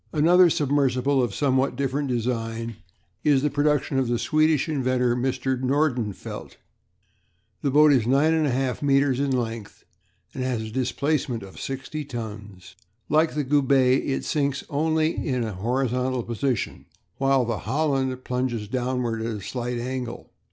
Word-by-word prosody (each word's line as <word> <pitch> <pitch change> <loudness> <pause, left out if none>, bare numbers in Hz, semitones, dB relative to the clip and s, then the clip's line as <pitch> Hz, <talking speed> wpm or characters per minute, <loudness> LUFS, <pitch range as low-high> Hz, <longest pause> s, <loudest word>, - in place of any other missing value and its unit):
Another 175 +3 +5
submersible 140 -2 +1
of 120 -5 -1
somewhat 135 -1 +1
different 140 +1 -1
design 115 -2 -2 0.5
is 145 -3 +3
the 150 - +1
production 145 -1 +1
of 130 - 0
the 120 0 +1
Swedish 155 +5 +2
inventor, 130 -5 +1
Mr. 130 +1 -1
Nordenfelt. 130 -6 -2 1.0
This 140 - 0
boat 150 +1 +6
is 120 -4 +2
9 140 +5 +3
1/2 130 -2 -1
metres 140 -2 +2
in 140 0 0
length, 115 -4 -3 0.5
and 130 - -3
has 125 -3 -1
a 110 - -7
displacement 130 -1 -1
of 95 -1 -11
sixty 135 +3 -5
tons. 105 -8 -8 0.4
Like 155 +2 +2
the 150 - 0
Goubet 135 -2 +3
it 135 - -2
sinks 140 -3 -1
only 160 +2 +1
in 125 -4 -1
a 110 -2 -3
horizontal 125 +4 -1
position, 120 +2 -2 0.3
while 135 -2 +2
the 115 -3 -2
Holland 135 -4 0
plunges 125 -4 -2
downward 125 -1 -2
at 115 - -2
a 110 -2 -3
slight 120 +4 -4
angle. 125 0 -5
130 Hz, 145 wpm, -24 LUFS, 120-140 Hz, 1.0 s, boat